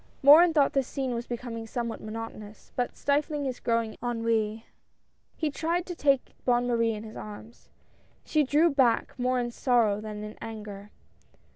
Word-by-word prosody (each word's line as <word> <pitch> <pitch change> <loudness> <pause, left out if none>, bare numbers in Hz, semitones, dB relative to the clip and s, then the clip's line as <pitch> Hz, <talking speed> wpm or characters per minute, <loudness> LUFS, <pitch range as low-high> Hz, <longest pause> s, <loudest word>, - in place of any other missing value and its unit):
Morin 320 +5 +9
thought 295 -3 +3
this 270 -2 +1
scene 265 -3 -2
was 235 +1 -4
becoming 230 -2 -5
somewhat 235 0 -4
monotonous, 215 -1 -8
but 245 -1 -2
stifling 290 0 0
his 255 -2 -3
growing 230 -2 0
ennui, 230 -2 -1 0.7
he 310 -2 -1
tried 335 +4 -1
to 360 - -5
take 275 -5 +1
Bonne 245 -1 +2
Marie 230 -2 +1
in 210 - -7
his 220 -1 -10
arms. 215 +2 -10 0.6
She 310 - +2
drew 300 +5 +3
back, 255 -5 +2
more 250 0 +1
in 240 -1 -2
sorrow 230 -5 +2
than 210 -1 -6
in 210 0 -9
anger. 210 -2 -8
240 Hz, 160 wpm, -28 LUFS, 220-275 Hz, 0.7 s, Morin